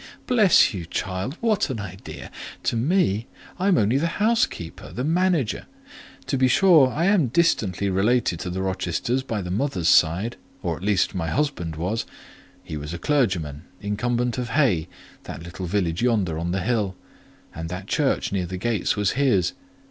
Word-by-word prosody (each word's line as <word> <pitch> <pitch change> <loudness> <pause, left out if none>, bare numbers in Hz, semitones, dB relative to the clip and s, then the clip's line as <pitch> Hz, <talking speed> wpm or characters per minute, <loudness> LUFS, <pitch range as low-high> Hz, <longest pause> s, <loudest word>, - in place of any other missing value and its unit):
Bless 215 - +5
you, 90 -4 -5
child; 95 - -3
what 215 -6 +1
an 125 -4 -3
idea! 95 -1 -8 0.3
To - - 0
me! 115 - +1 0.3
I 190 - +1
am 190 -4 +4
only 110 +6 +3
the 170 +3 -1
housekeeper—the 210 - -1
manager. 165 - +1 0.6
To 135 - -1
be 130 - +5
sure 165 -1 +6
I 165 +6 0
am 195 -8 +4
distantly 110 - +1
related 100 -1 +1
to 90 - -4
the 95 +2 -3
Rochesters 95 +6 -1
by 110 -6 -3
the 90 - -5
mother's 95 - 0
side, 90 +6 +3 0.3
or - - -1
at - - -11
least 100 -1 +1
my 85 -4 -2
husband 125 - -1
was; 95 +8 -2 0.6
he 75 - -6
was 75 +3 -5
a - - -4
clergyman, 90 - 0
incumbent 120 +5 -1
of 125 -1 -3
Hay—that 95 - -2
little 85 +2 -6
village 90 -2 0
yonder 105 -10 +1
on 85 +1 -2
the 95 +1 -1
hill—and 95 -6 -5
that 90 +2 -5
church 140 +6 0
near 95 -3 -1
the 95 +1 -5
gates 110 0 0
was 105 -2 +1
his. 115 -11 +2
105 Hz, 165 wpm, -24 LUFS, 90-135 Hz, 0.6 s, sure